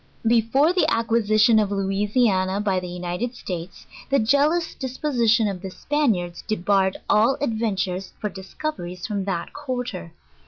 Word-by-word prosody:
Before 240 +8 +3
the 365 - +2
acquisition 225 -1 +3
of 210 -2 +1
Louisiana 195 0 +1
i>y 195 -3 0
the 180 - -6
United 180 +7 -4
States, 180 -4 -7 0.2
the 275 - +3
jealous 290 +8 +2
disposition 245 -4 +1
of 190 -3 -4
the 190 - -5
Spaniards 190 - -1
debarred 195 -2 +1
all 230 +6 +3
adven 225 -5 0
tures 185 0 -3
for 210 - -3
discoveries 190 - -6
from 200 -3 -2
that 175 -4 -3
quarter. 245 - -5
210 Hz, 135 wpm, -23 LUFS, 190-245 Hz, 0.2 s, Before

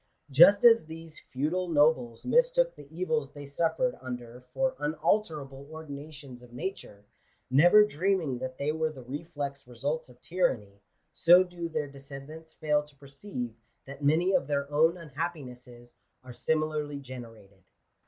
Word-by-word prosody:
Just 185 - +7
as 230 -8 +7
these 160 0 -10
feudal 160 +8 -2
nobles 145 -7 +2
mistook - - +3
the 140 - -13
evils 160 -4 -1
they 145 -1 -9
suffered 165 - 0
under 125 -1 -7
for 265 -1 0
unalterable 150 -4 -1
ordinations 145 -4 -9
of 125 -1 -15
nature, 120 - -6 0.5
never 175 +10 +7
dreaming 175 -7 0
that 130 0 -5
they 145 +2 0
were 160 0 0
the 135 -4 -11
reflex 140 0 -6
results 140 +6 -3
of 125 0 -18
tyranny, 115 - -1 0.3
so 180 +2 +7
do 175 -2 -6
their 155 -2 -2
descendants 140 +3 -11
fail 150 -1 +1
to 150 -1 -17
{fereeive 140 - -7 0.3
that 140 +1 -10
many 165 +6 +3
of - - +2
their 140 -1 -1
own 160 +3 +4
unhappinesses 130 -7 -7 0.3
are 130 -1 -10
similarly 155 0 -1
generated. 115 -7 -11
150 Hz, 140 wpm, -29 LUFS, 130-165 Hz, 0.5 s, Just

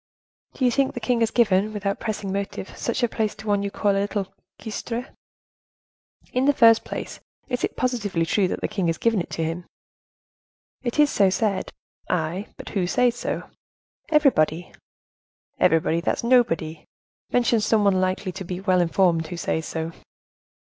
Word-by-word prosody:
"Do 260 - 0
you 245 - +4
think 275 +1 +1
the - - -3
king 240 +1 0
has 230 -1 +2
given, 215 -3 +2
without 200 -1 -2
pressing 210 -3 -3
motive, 200 -1 -4
such 235 +1 -2
a - - +5
place 220 -2 -2
to 215 +1 -12
one 205 -1 +1
you 200 - -2
call 205 +1 +1
a 195 0 +1
little 200 -1 -3 0.3
cuistre?" 230 +3 -5 1.2
"In 255 +1 +2
the 285 0 +4
first 230 -1 +6
place, - - -6 0.3
is 250 0 -2
it - - -1
positively 210 -9 0
true 190 +3 +2
that - - -4
the - - 0
king 190 -4 -1
has 165 - 0
given 225 -5 +2
it - - -7
to 165 - -3
him?" 165 +2 -4 1.1
"It 240 +1 -3
is 295 -1 +5
so 195 -2 +4
said." 195 +1 0 0.4
"Ay, 175 +4 -1
but - - -8
who 190 -4 -1
says 245 +5 +2
so?" - - -3 0.7
"Everybody." 180 - +2 0.9
"Everybody, 165 +1 +3
that's 170 - -1
nobody; 165 -11 +2 0.5
mention 240 -2 +3
some 215 0 +2
one 195 -2 +3
likely 185 +1 -1
to 190 +2 -7
be 180 0 -5
well 185 -2 +2
informed 170 -2 +2
who 175 - -6
says 160 -1 -2
so." 160 0 -3
200 Hz, 175 wpm, -24 LUFS, 180-230 Hz, 1.2 s, first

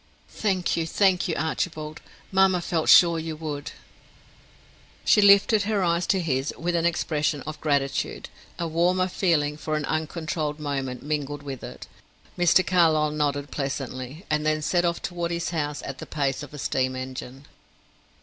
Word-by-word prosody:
"Thank 190 -4 0
you, 165 -1 -1
thank 190 0 +2
you, 165 - -1
Archibald. 155 0 -3 0.3
Mamma 190 -1 +4
felt 165 -2 -1
sure 170 -2 +7
you 160 0 -4
would." 150 -2 -5 1.3
She 210 - +5
lifted 200 +2 +6
her 205 -1 0
eyes 170 0 +1
to 195 - +2
his 140 -4 -1
with 175 +1 -2
an 170 0 +2
expression 150 -3 -1
of 155 0 -7
gratitude; 140 -3 -1 0.3
a 170 - -2
warmer 180 +3 +2
feeling 155 -6 +1
for 155 0 -3
an 150 -1 -1
uncontrolled 155 -1 -2
moment 135 -4 -3
mingled 145 -1 -3
with 135 -3 -7
it. - - -8 0.5
Mr. 175 +1 +4
Carlyle 160 -4 +3
nodded 145 -1 -1
pleasantly, 135 +3 -5
and 150 0 0
then 155 0 0
set 175 +3 +1
off 170 0 -1
toward 175 -2 -3
his 170 0 -2
house 150 -3 -3
at 135 -1 -6
the - - -8
pace 140 -2 -1
of 145 - -9
a 150 - -9
steam 130 -1 -1
engine. 130 +1 -7
155 Hz, 160 wpm, -25 LUFS, 145-175 Hz, 1.3 s, sure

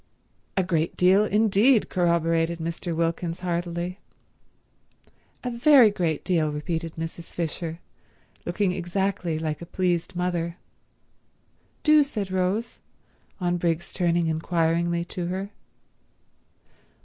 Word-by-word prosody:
"A 190 - +3
great 170 -2 -1
deal 190 +3 +5
indeed," 215 +3 +4
corroborated 170 -1 +1
Mr. 165 +1 -4
Wilkins 165 +1 -1
heartily. 175 +1 -3 1.4
"A 250 - -2
very 240 -2 +6
great 170 -6 -1
deal," 160 -5 +1
repeated 160 +2 -3
Mrs. 165 +1 -6
Fisher, 165 -1 -4 0.7
looking 185 +2 0
exactly 180 -1 -1
like 155 -1 -3
a - - -6
pleased 180 0 -1
mother. 175 -1 -2 1.3
"Do," 305 0 +6
said 215 -9 -3
Rose, 190 +5 -1 0.6
on 175 -1 0
Briggs's 170 -1 -1
turning 170 -2 +1
inquiringly 170 +1 0
to 175 0 -4
her. 190 +3 -4
175 Hz, 105 wpm, -25 LUFS, 165-190 Hz, 1.4 s, very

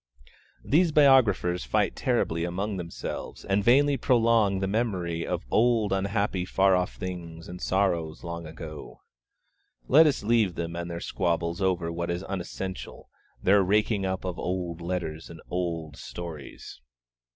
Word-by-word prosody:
These 165 +3 +3
biographers 120 - +4
fight - - 0
terribly 85 +1 0
among 95 +4 -2
themselves, 85 -2 -6
and 100 +1 +1
vainly 140 +5 +4
prolong 115 -6 +3
the 95 - -1
memory 95 -6 -1
of - - -3
'old 115 -3 +3
unhappy 100 -1 0
far 95 +1 +3
off 90 0 -1
things, 85 -3 -7
and 90 0 -8
sorrows 85 -5 0
long 85 -1 -6
ago.' 80 -1 -9 0.9
Let 155 +4 +7
us 140 -7 0
leave 110 -5 +2
them 85 0 -4
and 85 0 -4
their 85 0 -5
squabbles 85 0 -1
over 90 -3 0
what 85 +1 -3
is 85 +2 -2
unessential, 95 0 -6 0.3
their 100 +2 +5
raking 105 +2 +2
up 95 0 -2
of 90 -2 -4
old 90 -2 -3
letters 85 -2 -4
and 80 - -10
old 85 -5 -3
stories. 80 -7 -8
90 Hz, 140 wpm, -27 LUFS, 85-105 Hz, 0.9 s, Let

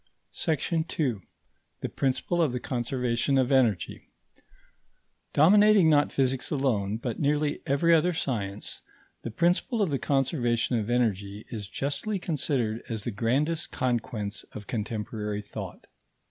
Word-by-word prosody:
§ 160 0 0
2. 125 - -1 0.6
THE - - -2
PRINCIPLE 140 +6 0
OF 155 -6 +2
THE 125 - -1
CONSERVATION 125 +1 0
OF 130 0 +2
ENERGY 120 -8 +1 1.2
Dominating 200 +2 +6
not 145 -1 +4
physics 130 -1 0
alone, 110 -8 0
but 120 -1 -4
nearly 150 0 +1
every 165 +5 +3
other 165 +2 +4
science, 105 - -3 0.4
the - - -5
principle 175 - +1
of 195 -7 +1
the 135 - 0
conservation 125 -4 +1
of 105 +1 -4
energy 105 -4 0
is 105 -4 -6
justly 170 +10 -2
considered 135 - -1
as 110 -3 -3
the 120 - -2
grandest 135 +10 0
conquest 115 -4 -2
of 105 - -8
contemporary 105 -1 -3
thought. - - -8
130 Hz, 130 wpm, -27 LUFS, 110-150 Hz, 1.2 s, Dominating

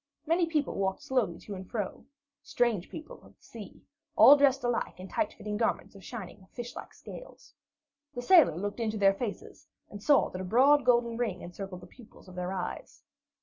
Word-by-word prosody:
Many 335 +2 +2
people 305 -3 -1
walked 190 -1 -2
slowly 235 -10 0
to 210 - -8
and 185 -1 -8
fro 210 -5 -4 0.4
strange 230 -7 0
people 310 +1 -10
of - - -19
the - - -33
sea, - - -12 0.3
all 290 - +9
dressed 280 -1 +3
alike 240 -5 -2
in 185 - -8
tight 315 - -1
fitting 210 0 -5
garments 225 - -1
of 195 -2 -14
shining, 195 -4 -9
fish 240 0 -7
like - - -9
scales. - - -12 0.6
The 245 - -4
sailor 330 - +6
looked 205 +5 -4
into 220 -2 -1
their 195 -1 +4
faces 205 +1 -7 0.2
and 205 - -9
saw 285 +6 +3
that 185 - -5
a - - -4
broad 260 +8 +4
golden 235 -2 +3
ring 220 -7 -2
encircled 180 +1 -8
the - - -11
pupils 220 +1 -17
of 185 - -12
their 180 0 -4
eyes. 185 -2 -6
220 Hz, 190 wpm, -29 LUFS, 190-255 Hz, 0.6 s, all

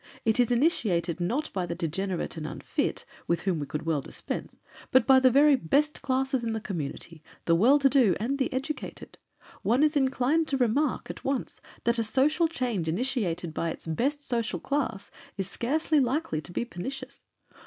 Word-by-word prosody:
It 220 +2 +2
is 245 - +4
initiated, 210 - +1
not 240 - -1
by 185 -2 -2
the 170 - -3
degenerate 175 +2 -2
and 155 -2 -5
unfit, - - -3 0.2
with 170 -1 +1
whom 185 -5 0
we 145 - -4
could 150 - -4
well 160 -3 +1
dispense, - - -6 0.3
but 260 -2 +4
by 265 -1 +7
the 260 0 +5
very 285 +3 +6
best 285 - +1
classes 265 -1 0
in 225 -1 -1
the 220 - -2
community, 165 -4 -5 0.2
the 165 - +3
well 235 +12 +5
to 275 -1 +4
do 255 - +4
and 265 +6 -1
the 265 - 0
educated. 270 +4 -5 0.4
One 245 +7 +3
is 305 0 +3
inclined 275 +3 +2
to 275 - 0
remark, 260 +3 +1
at - - -12
once, 270 -2 -3 0.2
that 235 0 +2
a - - +2
social 290 +9 +2
change 245 - -2
initiated 180 - -1
by 165 - -1
its - - -6
best 270 - -1
social 235 -1 -1
class 265 -8 -2 0.3
is 195 -2 -2
scarcely 300 +8 +1
likely 260 - 0
to 175 - -10
be 235 - -2
pernicious. 260 +7 -7
240 Hz, 185 wpm, -28 LUFS, 180-275 Hz, 0.4 s, by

